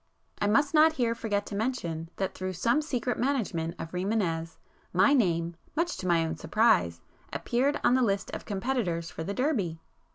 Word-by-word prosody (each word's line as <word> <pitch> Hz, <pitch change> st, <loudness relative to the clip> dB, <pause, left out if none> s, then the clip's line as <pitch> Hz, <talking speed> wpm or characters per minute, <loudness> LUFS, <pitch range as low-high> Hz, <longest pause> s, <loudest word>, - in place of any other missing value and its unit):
I 205 Hz, -, +2 dB
must 280 Hz, +8 st, +3 dB
not 315 Hz, +1 st, +6 dB
here 240 Hz, -6 st, +1 dB
forget 205 Hz, -3 st, -2 dB
to 205 Hz, -, -6 dB
mention, 175 Hz, -9 st, -2 dB
that 190 Hz, -, -2 dB
through 185 Hz, 0 st, -4 dB
some 235 Hz, -, +2 dB
secret 250 Hz, -5 st, -2 dB
management 210 Hz, -11 st, -1 dB
of 165 Hz, 0 st, -6 dB
Rimânez, 180 Hz, -4 st, -1 dB, 0.4 s
my 185 Hz, +10 st, +5 dB
name, 170 Hz, -, +1 dB, 0.2 s
much 335 Hz, +2 st, 0 dB
to 185 Hz, -, -4 dB
my 170 Hz, -2 st, +3 dB
own 160 Hz, 0 st, -3 dB
surprise, 160 Hz, -, +2 dB, 0.3 s
appeared 270 Hz, +5 st, 0 dB
on -, -, +4 dB
the 260 Hz, -, +4 dB
list 200 Hz, -5 st, 0 dB
of -, -, -5 dB
competitors 195 Hz, -6 st, -2 dB
for 160 Hz, -, -5 dB
the 200 Hz, +4 st, -4 dB
Derby. 215 Hz, -, 0 dB
200 Hz, 175 wpm, -28 LUFS, 170-250 Hz, 0.4 s, not